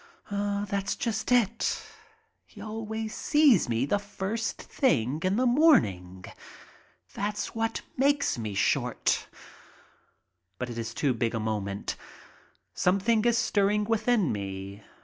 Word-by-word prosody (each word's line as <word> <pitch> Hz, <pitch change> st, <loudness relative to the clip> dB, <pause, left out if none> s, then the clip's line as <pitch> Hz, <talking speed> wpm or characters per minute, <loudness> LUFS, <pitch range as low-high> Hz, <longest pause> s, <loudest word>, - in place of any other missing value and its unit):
That's 200 Hz, 0 st, -1 dB
just 225 Hz, 0 st, -2 dB
it. 235 Hz, -2 st, +2 dB, 0.7 s
He -, -, -16 dB
always 220 Hz, 0 st, -5 dB
sees 295 Hz, -, +4 dB
me 115 Hz, +2 st, +1 dB
the 205 Hz, +8 st, +1 dB
first 205 Hz, +2 st, -4 dB
thing 145 Hz, -, 0 dB
in 185 Hz, +1 st, +1 dB
the 255 Hz, +3 st, +2 dB
morning. 100 Hz, -, +3 dB, 0.9 s
That's 205 Hz, +1 st, -3 dB
what 225 Hz, 0 st, -2 dB
makes 280 Hz, +2 st, +2 dB
me 110 Hz, -4 st, -5 dB
short. -, -, +1 dB, 1.3 s
But 125 Hz, +2 st, -4 dB
it 115 Hz, -, -5 dB
is 115 Hz, 0 st, -5 dB
too 140 Hz, -4 st, +1 dB
big 115 Hz, 0 st, -1 dB
a -, -, -1 dB
moment. 105 Hz, -2 st, -3 dB, 0.8 s
Something 205 Hz, +4 st, +2 dB
is 235 Hz, -1 st, +3 dB
stirring 210 Hz, -1 st, +2 dB
within 225 Hz, -3 st, +1 dB
me. 100 Hz, 0 st, -5 dB
200 Hz, 120 wpm, -28 LUFS, -, 1.3 s, sees